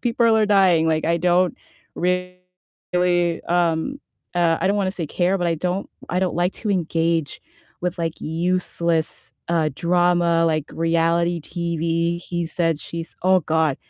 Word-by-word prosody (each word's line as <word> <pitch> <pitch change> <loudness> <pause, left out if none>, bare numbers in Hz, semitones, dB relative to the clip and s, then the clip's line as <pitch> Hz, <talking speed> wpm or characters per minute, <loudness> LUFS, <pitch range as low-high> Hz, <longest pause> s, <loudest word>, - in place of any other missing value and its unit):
people 230 -2 +3
are 215 -1 +3
dying. 185 -5 +4
Like 160 -1 +1
I 170 0 +2
don't 180 +1 +2 0.4
really, 180 -1 -2
um, 175 +9 0 0.3
uh, 170 -2 +3
I 180 - +1
don't 200 +2 +2
wanna 195 -2 0
say 170 -5 -4
care, 180 +5 +1
but 175 - 0
I 165 -1 0
don't 180 +4 -2 0.2
I 180 - 0
don't 185 -3 -1
like 175 +2 0
to 215 - -3
engage 165 -4 0 0.4
with 180 0 -3
like 165 -1 -3
useless, 170 -1 -1 0.2
uh, 165 -2 +2
drama, 175 0 +2
like 155 -2 0
reality 170 +1 +1
TV. 170 +1 -1
He 175 -1 -3
said 165 -2 0
she's 165 0 -7
Oh 185 0 +5
God. 160 -3 +1
170 Hz, 150 wpm, -22 LUFS, 165-180 Hz, 0.4 s, Oh